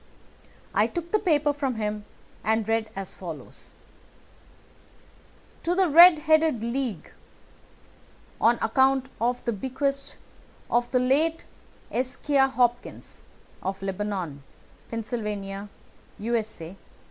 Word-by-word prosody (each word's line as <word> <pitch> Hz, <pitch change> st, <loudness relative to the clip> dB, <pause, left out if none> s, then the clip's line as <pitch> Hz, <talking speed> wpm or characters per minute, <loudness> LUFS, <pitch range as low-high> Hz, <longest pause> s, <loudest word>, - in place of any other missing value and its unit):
I -, -, +3 dB
took 345 Hz, -1 st, -5 dB
the 430 Hz, -, +3 dB
paper 300 Hz, -6 st, +2 dB
from 275 Hz, -4 st, -2 dB
him 210 Hz, -1 st, -3 dB, 0.4 s
and 220 Hz, -1 st, +1 dB
read 225 Hz, -1 st, 0 dB
as 195 Hz, -1 st, -5 dB
follows: 165 Hz, -5 st, -9 dB, 1.9 s
"TO 345 Hz, +1 st, 0 dB
THE 375 Hz, -2 st, +3 dB
RED 340 Hz, +2 st, +9 dB
HEADED 315 Hz, -7 st, +3 dB
LEAGUE: 235 Hz, -, -3 dB, 1.3 s
On 235 Hz, +1 st, +5 dB
account 265 Hz, +2 st, +3 dB
of 245 Hz, +1 st, 0 dB
the 235 Hz, -, 0 dB
bequest 275 Hz, +5 st, -3 dB, 0.5 s
of 240 Hz, 0 st, +2 dB
the 255 Hz, -, +2 dB
late 295 Hz, +6 st, +2 dB, 0.5 s
Ezekiah 270 Hz, +2 st, +1 dB
Hopkins, 245 Hz, -2 st, -1 dB, 0.4 s
of 190 Hz, +1 st, -4 dB
Lebanon, 190 Hz, -6 st, -3 dB, 0.5 s
Pennsylvania, 210 Hz, -3 st, -4 dB, 0.5 s
U.S.A. 215 Hz, -5 st, -3 dB
240 Hz, 100 wpm, -26 LUFS, 210-275 Hz, 1.9 s, RED